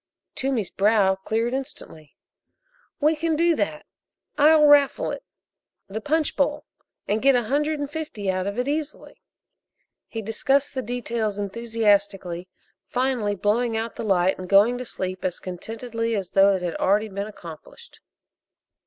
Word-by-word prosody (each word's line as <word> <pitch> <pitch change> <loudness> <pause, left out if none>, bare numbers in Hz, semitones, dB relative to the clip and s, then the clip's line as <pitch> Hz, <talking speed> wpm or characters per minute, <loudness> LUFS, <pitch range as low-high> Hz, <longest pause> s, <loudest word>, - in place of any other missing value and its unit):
Toomey's 260 -7 -1
brow 200 -1 +3
cleared 220 +5 -2
instantly. 260 - -7 0.8
"We 310 +2 +3
can 320 +1 0
do 335 +1 +3
that - - -2 0.5
I'll 300 +1 +6
raffle 290 -1 +4
it - - -5 0.7
the 215 +3 -5
punch 310 +4 0
bowl 295 +1 0 0.4
and 215 +2 0
get 275 0 +5
a 245 - +2
hundred 295 +6 0
and 290 - -2
fifty 290 -9 -6
out 185 0 0
of 200 +2 -4
it 250 +1 -1
easily." 300 +1 -4 0.9
He 225 -1 -6
discussed 270 +6 +1
the 260 - -2
details 235 -4 -3
enthusiastically, 205 -4 0 0.4
finally 250 -5 -1
blowing 225 +4 0
out 225 +1 -4
the - - -5
light 190 -3 +2
and 185 0 -7
going 215 +5 +5
to 250 - -5
sleep 185 -4 -4
as 180 -2 -2
contentedly 230 +5 -4
as 195 -3 -4
though 195 0 +5
it 180 -3 -3
already 205 +3 +2
had 210 - -11
been 200 +1 -3
accomplished. 190 - -12
225 Hz, 150 wpm, -24 LUFS, 195-275 Hz, 0.9 s, I'll